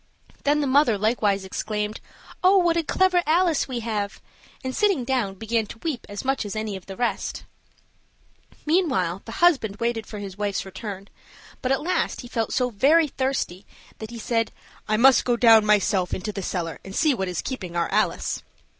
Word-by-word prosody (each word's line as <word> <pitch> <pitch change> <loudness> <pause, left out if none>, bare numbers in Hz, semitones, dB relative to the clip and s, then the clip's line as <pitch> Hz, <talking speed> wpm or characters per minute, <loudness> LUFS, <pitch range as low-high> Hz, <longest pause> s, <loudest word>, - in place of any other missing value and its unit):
Then 295 +1 +3
the - - 0
mother 260 -5 +4
likewise 205 -2 +1
exclaimed, 210 +2 -3 0.4
"Oh, 380 +2 +6
what 345 -3 +3
a 335 - +2
clever 365 +3 +2
Alice 335 -1 +2
we 250 -3 -4
have!" 210 -3 -3 0.4
and, 260 0 -3
sitting 395 - +2
down, 240 -6 -1
began 225 +2 -1
to 230 - -10
weep 300 -7 -3
as 205 +4 -6
much 270 -1 0
as 205 0 -6
any 215 -2 -3
of 190 - -10
the 195 -1 -8
rest. 225 -5 -2 1.2
Meanwhile 255 - +1
the 225 - -8
husband 260 - +4
waited 230 -1 -2
for 215 - -7
his 200 -1 -8
wife's 200 -2 -1
return; 195 0 -7 0.5
but 255 - -1
at 270 - +1
last 355 0 -1
he 245 - -10
felt 225 -2 -2
so 250 -1 +1
very 295 +8 +4
thirsty 260 -9 -2 0.4
that 220 - -7
he 235 - -8
said, 230 0 -1 0.4
"I 215 0 +2
must 260 +1 +6
go 240 -1 +1 0.2
myself 205 -3 +2
down - - -2
into 205 +3 -4
the 200 - -5
cellar 175 -3 -3
and 195 0 -9
see 310 -3 +3
what 190 -6 -2
is 180 -2 -3
keeping 190 -10 -5
our 170 -1 +1
Alice." 215 +2 0
225 Hz, 190 wpm, -24 LUFS, 200-270 Hz, 1.2 s, Oh